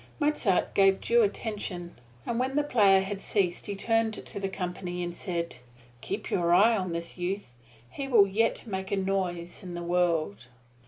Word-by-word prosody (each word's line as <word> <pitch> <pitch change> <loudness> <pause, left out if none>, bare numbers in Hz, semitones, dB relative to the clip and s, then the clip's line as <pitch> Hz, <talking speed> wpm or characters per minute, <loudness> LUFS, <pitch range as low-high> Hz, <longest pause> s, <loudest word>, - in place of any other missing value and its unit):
Mozart 290 - +1
gave 195 -1 +4
due 235 0 +3
attention, 200 -5 -3 0.3
and 235 - -1
when 260 +2 -1
the 295 - +3
player 205 -9 +5
had 195 +1 -4
ceased 185 -4 0
he 200 - -3
turned 225 +2 +1
to 205 - -7
the 195 -1 -2
company 180 -1 -4
and 175 0 -4
said, 170 -7 -3 0.4
"Keep 200 +8 -5
your 175 -1 +3
eye 225 +5 +6
on 185 -4 -2
this 170 +2 -5
youth 180 -7 -3 0.3
he 275 - -6
will 230 -7 +6
yet 220 +6 0
make 190 -3 -4
a 200 - +1
noise 185 -3 -2
in 180 -2 -7
the 175 - -5
world!" 165 - 0
195 Hz, 175 wpm, -28 LUFS, 175-215 Hz, 0.4 s, eye